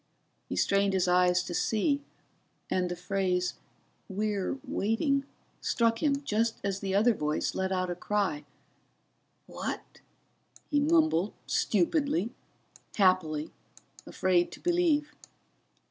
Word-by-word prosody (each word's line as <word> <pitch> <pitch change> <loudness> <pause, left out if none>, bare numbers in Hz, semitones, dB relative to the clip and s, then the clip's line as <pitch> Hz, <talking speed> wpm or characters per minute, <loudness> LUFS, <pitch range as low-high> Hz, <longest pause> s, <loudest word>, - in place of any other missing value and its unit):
He - - -3
strained 200 0 +2
his 185 -1 +2
eyes 180 0 +4
to 180 - -6
see, 280 - +1 0.7
and 180 -1 +1
the 175 - -3
phrase 180 0 -1 0.6
we're 205 +3 -1
waiting 275 +7 0 0.4
struck 230 -1 +1
him 285 -2 +1
just 225 -2 0
as 200 -1 -1
the 195 -1 -2
other 225 +4 +5
voice 150 -5 -1
let 190 0 -1
out 185 -1 0
a - - 0
cry. 180 -4 -1 1.0
"What - - -6 0.3
?" - - -28
he 290 - +3
mumbled, 305 - +3
stupidly, 220 - +1 0.6
happily, 165 -6 +2 0.6
afraid 180 -2 +1
to - - -10
believe. 335 -4 +1
200 Hz, 115 wpm, -29 LUFS, 180-245 Hz, 1.0 s, other